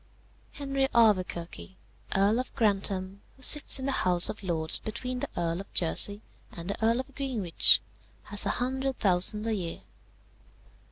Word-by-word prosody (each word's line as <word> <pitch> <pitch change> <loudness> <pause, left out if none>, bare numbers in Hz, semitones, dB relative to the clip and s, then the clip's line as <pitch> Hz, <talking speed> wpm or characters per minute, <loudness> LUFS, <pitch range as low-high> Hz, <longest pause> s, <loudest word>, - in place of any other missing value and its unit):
"Henry 275 -1 -2
Auverquerque, 190 -5 0 0.4
Earl 200 +4 +2
of 255 - -7
Grantham, 195 -2 -1 0.2
who 265 - -13
sits 295 +2 +5
in 260 - -6
the 275 - -1
House 180 -8 +4
of 215 - -7
Lords 160 -4 +3
between 250 +3 -6
the - - -5
Earl 170 +1 -2
of 195 - -16
Jersey 205 +5 +1 0.3
and 170 +3 -6
the 210 - -7
Earl 230 +3 +1
of 275 +1 -17
Greenwich, 240 - +3 0.4
has 205 -1 +1
a - - -1
hundred 265 +1 -3
thousand 195 +2 0
a 225 - -1
year. 175 - -5
210 Hz, 155 wpm, -27 LUFS, 185-250 Hz, 0.4 s, sits